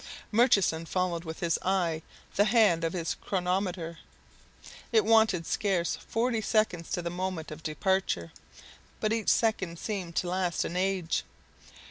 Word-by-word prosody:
Murchison 205 -8 +3
followed 180 -2 -1
with 160 0 -7
his 170 -2 +1
eye 175 -4 0 0.3
the 205 - +4
hand 210 -7 +4
of 165 - 0
his 170 -3 -1
chronometer. 180 -3 -2 0.9
It 440 -2 +4
wanted 220 -7 +4
scarce 185 -4 0
forty 230 0 -1
seconds 210 -6 +1
to 175 - -1
the 170 - -3
moment 180 -3 -4
of 155 +1 -8
departure, 155 - 0 0.7
but 215 0 +1
each 225 -1 0
second 195 -7 +1
seemed 185 -4 -4
to 180 - 0
last 180 -1 0
an 175 - -4
age! 185 -2 0
185 Hz, 140 wpm, -29 LUFS, 170-205 Hz, 0.9 s, the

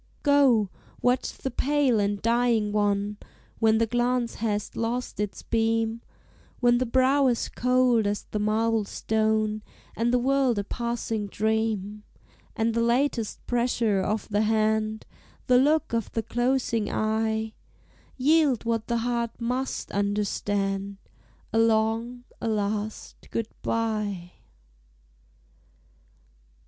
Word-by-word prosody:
Go, 265 -9 +4 0.3
watch 250 +1 +2
the 265 - -5
pale 275 -3 +2
and 205 0 0
dying 230 -2 +2
one, 205 0 0 0.4
When 220 -1 +4
the 230 - +3
glance 240 +1 0
hast 210 -2 -2
lost 235 +1 -3
its 210 -1 -3
beam; 225 0 0 0.6
When 240 -1 +4
the 255 - 0
brow 260 +3 +3
is 240 -2 0
cold 250 -3 +2
as 205 0 -2
the 210 - -4
marble 220 +1 +1
stone, 215 0 0 0.3
And 235 +1 +1
the 250 - +4
world 260 -1 +2
a 200 - 0
passing 230 -1 -3
dream; 215 -1 -1 0.5
And 225 +1 0
the 230 - +1
latest 235 -1 0
pressure 235 -4 +1
of 210 +3 -2
the 205 0 +1
hand, 220 0 +1 0.4
The 250 -1 +5
look 300 0 +2
of 230 -3 -1
the 225 - -1
closing 240 -3 0
eye, 220 0 -1 0.6
Yield 285 -3 +3
what 230 -1 -1
the 235 - 0
heart 235 -1 -2
must 250 +3 -3
understand, 200 -1 -1 0.6
A 225 - +3
long, 225 +2 +1 0.2
a - - -2
last 210 0 -3
Good 225 -1 -3
bye. 210 -6 -2
225 Hz, 120 wpm, -26 LUFS, 215-245 Hz, 0.6 s, The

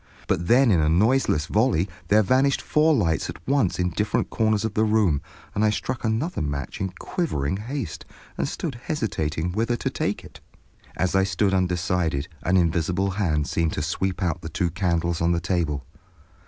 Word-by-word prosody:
But 85 +1 0
then 125 0 +5
in 90 - +4
a 75 0 +3
noiseless 100 - +3
volley 105 -1 +2 0.2
there 105 +3 +5
vanished 130 +7 +3
four 155 +1 +3
lights 85 - 0
at - - -6
once 135 -9 +2
in 90 -1 0
different 105 +5 -1
corners 110 -1 +1
of 110 - -2
the 110 - +2
room, 105 -9 +2 0.3
and 105 - 0
I 110 - +4
struck 120 +4 -3
another 115 +10 -1
match 70 +2 -4
in 95 - 0
quivering 95 - -2
haste, 120 - -5 0.3
and - - -1
stood 140 -9 -4
hesitating 90 - -2
whither 115 +5 0
to - - -2
take - - -2
it. - - -13 0.6
As 95 - 0
I 95 - +4
stood 95 +1 +1
undecided, 90 -5 0
an 90 +6 +2
invisible 90 +3 +1
hand 85 -7 0
seemed 80 +1 0
to 75 - -2
sweep 90 +4 -2
out 90 0 -1
the 80 - -6
two 85 +2 -1
candles 85 -2 0
on 85 +1 +3
the 85 - +1
table. 80 -6 -1
95 Hz, 180 wpm, -24 LUFS, 85-110 Hz, 0.6 s, then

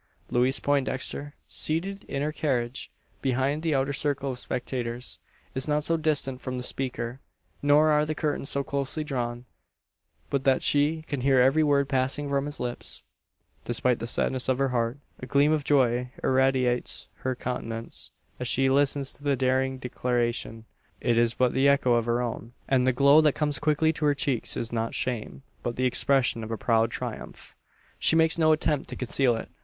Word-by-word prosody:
Louise 125 +3 +2
Poindexter, 145 +1 -1
seated 195 +6 -2
in 140 +1 -3
her 150 - -1
carriage 130 -5 -2 0.3
behind 135 +3 0
the 160 -3 0
outer 135 +1 0
circle 140 -1 -1
of 125 - -4
spectators, 125 -1 -4 0.3
is 130 +2 -1
not 150 0 +1
so 165 - +1
distant 150 -5 0
from 130 -1 -4
the 125 - -4
speaker, 125 -1 -2 0.4
nor 150 +2 +5
are 150 0 +4
the 155 +1 -2
curtains 145 -2 -2
so 140 - 0
closely 140 +3 -2
drawn, 120 -4 -3 0.9
but 140 -1 0
that 135 -1 +2
she 150 +2 +2
can 145 -4 -4
hear 135 0 +4
every 135 +5 +4
word 140 -2 +3
passing 135 +2 -1
from 140 0 0
his 145 - -6
lips. 120 -1 -5 0.6
Despite 120 +1 +1
the 115 - -4
sadness 130 +2 +1
of 130 - +2
her 135 0 +1
heart, 120 0 -1 0.2
a 130 - -7
gleam 140 +3 +3
of 155 -2 +1
joy 125 -3 +2
irradiates 130 -2 +1
her 130 0 -2
countenance, 115 -2 -4 0.3
as 125 - -3
she 135 +2 +2
listens 140 0 +2
to 145 - -15
the 140 -1 +2
daring 130 +1 +1
declaration. 120 -2 -2 0.3
It 120 - +1
is 115 0 +2
but 125 -1 +2
the 135 +2 +3
echo 140 -3 +4
of 120 -1 +2
her 120 +1 +1
own; 115 0 -5
and 130 -1 +2
the - - +5
glow 140 +4 +6
that 150 -3 +3
comes 145 -3 -1
quickly 155 +2 +2
to 150 - -2
her 145 -1 +3
cheeks 135 -4 0
is 115 - -4
not 115 0 -2
shame, 125 +1 -3 0.2
but 120 - -3
the 130 - 0
expression 125 -2 +2
of 110 - -6
a 115 - -3
proud 115 -1 +2
triumph. - - -7 0.5
She - - +3
makes 160 +1 +4
no 155 -1 +5
attempt 155 -2 0
to - - -5
conceal 125 -1 +1
it. 115 - -6
135 Hz, 185 wpm, -27 LUFS, 125-145 Hz, 0.9 s, glow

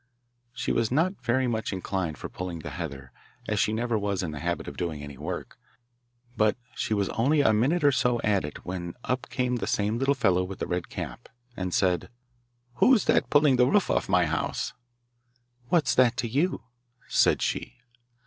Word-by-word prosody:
She 120 -1 -2
was 115 -1 +1
not 165 +3 +1
very 125 +3 +2
much 110 -3 -1
inclined 95 -4 -3
for - - -6
pulling 90 -3 -6
the - - -7
heather, 70 -7 -6 0.4
as - - 0
she - - +2
never 115 0 0
was 100 -2 -1
in 80 - -3
the 75 - -6
habit 85 +3 -2
of - - -6
doing 80 -5 -3
any 70 -1 -8
work, 80 +6 -6 0.8
but 110 -1 +2 0.2
she 110 - -1
was 100 -1 0
only 145 +6 +2
a 110 -6 +4
minute 140 +10 +2
or 145 - +6
so 125 -2 +1
at 100 -3 +2
it 75 - -8
when 85 -1 -5
up 125 0 -2
came 125 -1 0
the - - -3
same 105 +3 0
little 135 +1 +2
fellow 95 -7 +2
with 95 +1 -6
the - - -3
red 90 -1 -3
cap, - - -7 0.3
and 90 -1 -3
said: 90 -1 +1 0.7
'Who's 250 - +5
that - - +2
pulling 145 -3 +5
the 125 0 +5
roof 205 +7 +2
off - - 0
my - - +4
house?' - - -2 1.0
'What's 165 -5 +3
that 125 -1 +4
to 125 -2 -1
you?' 145 +6 0 0.4
said - - +3
she. 120 - -2
110 Hz, 190 wpm, -27 LUFS, 90-130 Hz, 1.0 s, or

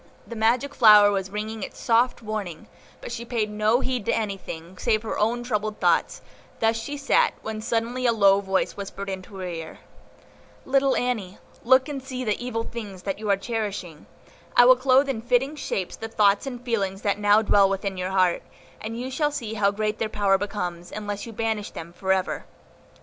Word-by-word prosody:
The 235 - -8
magic 240 +6 +1
flower 210 -4 +7
was 195 -1 -2
ringing 215 +2 -5
its - - -7
soft 235 +1 +2
warning, 205 -7 -5 0.3
but - - -7
she 235 0 -5
paid 230 -3 -2
no 215 +4 +2
heed 255 -4 -2
to - - +1
anything, 190 -4 -4
save 220 -2 +1
her 220 - -3
own 235 +3 +1
troubled 215 -3 -2
thoughts; - - +1 0.4
thus 225 0 +2
she 285 +6 -5
sat, 475 +11 +2
when 220 0 -5
suddenly 235 +3 -1
a - - +5
low 200 -3 +4
voice 190 -1 -1
whispered 200 0 -6
in 190 -1 -4
her 190 0 -9
ear,— 165 -3 -6 0.9
"Little 270 0 +2
Annie, 220 -7 -2 0.3
look 260 +2 +5
and 285 -2 -5
see 255 -1 -5
the 215 0 -1
evil 230 -2 -2
things 210 -6 -8
that 195 0 -3
you 215 -1 -4
are 200 - +4
cherishing; 200 -7 -5 0.5
I 245 - +8
will 255 +1 +8
clothe 260 +2 +3
in 255 -5 -2
fitting 250 +5 +1
shapes 195 -10 -3
the 225 - -6
thoughts 205 +1 +2
and 245 -2 -7
feelings 195 -5 -1
that 205 0 0
now 205 +1 +4
dwell 200 -2 +4
within 195 0 -2
your 185 0 -3
heart, 185 -2 +2 0.4
and 225 +2 -5
you 255 +2 -4
shall 295 +2 +1
see 235 -7 -5
how 205 -2 +2
great 210 +1 -2
their 220 - -1
power 200 -2 +2
becomes, 180 -4 -4
unless 205 0 -5
you - - -7
banish 220 -1 -2
them 165 +1 -9
for 190 +2 -2
ever." 190 -1 0
215 Hz, 195 wpm, -25 LUFS, 195-240 Hz, 0.9 s, I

